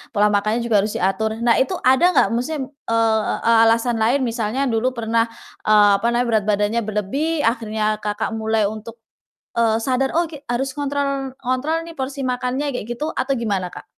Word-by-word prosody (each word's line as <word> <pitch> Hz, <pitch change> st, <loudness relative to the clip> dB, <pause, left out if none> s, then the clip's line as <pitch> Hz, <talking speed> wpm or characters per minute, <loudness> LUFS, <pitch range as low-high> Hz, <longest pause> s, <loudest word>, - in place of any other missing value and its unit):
pola 210 Hz, +1 st, +4 dB
makannya 215 Hz, +3 st, +1 dB
juga 220 Hz, -4 st, +3 dB
harus 215 Hz, -, -4 dB
diatur. 215 Hz, +4 st, 0 dB
Nah, 235 Hz, -1 st, +4 dB
itu 265 Hz, -, +1 dB
ada 260 Hz, +6 st, +4 dB
nggak, -, -, +5 dB
maksudnya 255 Hz, +6 st, -2 dB
m -, -, -7 dB, 0.2 s
eee, 225 Hz, -1 st, +1 dB, 0.3 s
alasan 230 Hz, +1 st, +2 dB
lain 240 Hz, +6 st, +2 dB
misalnya 230 Hz, +1 st, -2 dB
dulu 225 Hz, +3 st, +1 dB
pernah, 230 Hz, 0 st, +1 dB, 0.4 s
eee, 210 Hz, -1 st, +6 dB
apa -, -, -5 dB
namanya, 240 Hz, +1 st, +2 dB
berat 220 Hz, -2 st, +2 dB
badannya 210 Hz, +2 st, +1 dB
berlebih, 280 Hz, +10 st, -1 dB
akhirnya, 220 Hz, -2 st, 0 dB
Kakak, 210 Hz, 0 st, -2 dB
mulai 220 Hz, -1 st, 0 dB
untuk, 220 Hz, +1 st, -8 dB, 0.6 s
eee, 225 Hz, -1 st, +2 dB
sadar, 265 Hz, +2 st, 0 dB
"Oke, 310 Hz, -4 st, -5 dB
harus 270 Hz, +3 st, -1 dB
ngontrol 275 Hz, -2 st, -2 dB
ngontrol 265 Hz, +6 st, -1 dB
nih 335 Hz, -, -10 dB
porsi 270 Hz, +1 st, -4 dB
makannya," 255 Hz, +2 st, -2 dB
kayak -, -, -5 dB
gitu 300 Hz, +6 st, -3 dB
atau 275 Hz, -, -1 dB
gimana 195 Hz, -6 st, -2 dB
Kak? -, -, -10 dB
230 Hz, 175 wpm, -21 LUFS, 215-265 Hz, 0.6 s, eee